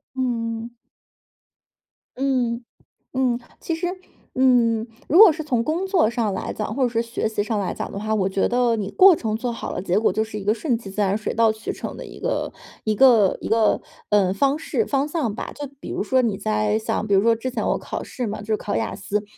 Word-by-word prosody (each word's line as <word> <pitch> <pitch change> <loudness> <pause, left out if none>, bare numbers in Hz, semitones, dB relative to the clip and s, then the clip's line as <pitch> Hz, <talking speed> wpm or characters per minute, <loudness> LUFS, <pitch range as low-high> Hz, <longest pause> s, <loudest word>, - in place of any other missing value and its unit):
嗯。 230 -2 -2 1.4
嗯。 250 -3 0 0.5
嗯。 255 -2 +1 0.2
其 330 - -3
实， 355 +2 -2 0.5
嗯， 240 -3 +3 0.2
如 330 - +3
果 420 -2 +10
是 315 +1 -5
从 250 -6 0
工 325 +8 -1
作 370 - +3
上 230 -4 -1
来 190 - -4
讲 210 - -4
或 270 - +1
者 250 - +2
说 230 -1 0
学 230 -1 -2
习 215 -2 -1
上 215 0 -1
来 190 -3 -2
讲 - - -5
的 200 - -5
话， 215 +1 -2
我 195 -3 +1
觉 190 0 +1
得 245 -1 +2
你 205 -3 -3
过 380 -2 +7
程 220 -7 -2
做 245 +1 -2
好 230 - -5
了， - - -4
结 185 +1 +1
果 220 - +2
就 220 - +1
是 220 -1 -7
一 - - -7
个 205 +2 +2
顺 240 +1 -1
其 225 -4 -10
自 195 +2 -3
然、 200 0 +2
水 220 - -3
到 225 -1 +4
渠 220 0 -5
成 - - -6
的 - - -7
一 - - -11
个 - - -2 0.3
一 215 - +1
个 225 -5 +5
一 - - -4
个， 220 -1 +3 0.3
呃， 195 -3 +3
方 275 +7 +2
式、 425 +7 -1
方 280 0 0
向 300 -9 -1
吧。 220 - -6
就 290 -1 -5
比 - - -8
如 - - -2
说 260 +4 +2
你 220 -5 0
在 215 +1 0
像 215 -1 -2
比 200 - +1
如 195 - +5
说 230 0 +4
之 235 +3 -4
前 230 -3 -2
我 - - +1
考 - - -5
试 245 -3 -4
嘛， 210 - -4
就 210 - -11
是 215 -1 +1
考 205 - -3
雅 - - -1
思， 205 +1 -2
230 Hz, 255 characters per minute, -23 LUFS, 210-260 Hz, 1.4 s, 果